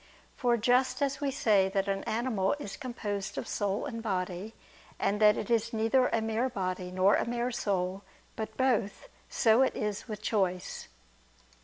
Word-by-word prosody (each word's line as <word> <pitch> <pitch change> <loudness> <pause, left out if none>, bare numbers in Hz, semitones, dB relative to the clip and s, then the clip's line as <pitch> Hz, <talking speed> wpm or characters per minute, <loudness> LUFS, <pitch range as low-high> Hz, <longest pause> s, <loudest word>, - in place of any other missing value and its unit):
For 240 -2 +2
just 250 +5 +2
as 275 +1 -1
we 285 - +1
say 210 -8 +3
that 195 0 -1
an 195 0 -1
animal 220 -4 0
is 205 -10 -6
composed 210 -6 -4
of - - -3
soul 200 0 -1
and 230 -5 -5
body, 190 0 -3 0.4
and 210 +2 0
that 210 0 +6
it - - -4
is 230 0 +1
neither 225 +4 +3
a 230 - 0
mere 225 +3 0
body, 185 -4 -3
nor 185 +2 +3
a - - +1
mere 240 +1 -1
soul, 195 -4 -1 0.3
but 220 0 -5
both; 255 - 0 0.2
so 225 +1 +4
is 210 -6 0
it - - -19
with 210 -1 -6
choice." 185 -5 -1
220 Hz, 170 wpm, -30 LUFS, 195-240 Hz, 0.4 s, that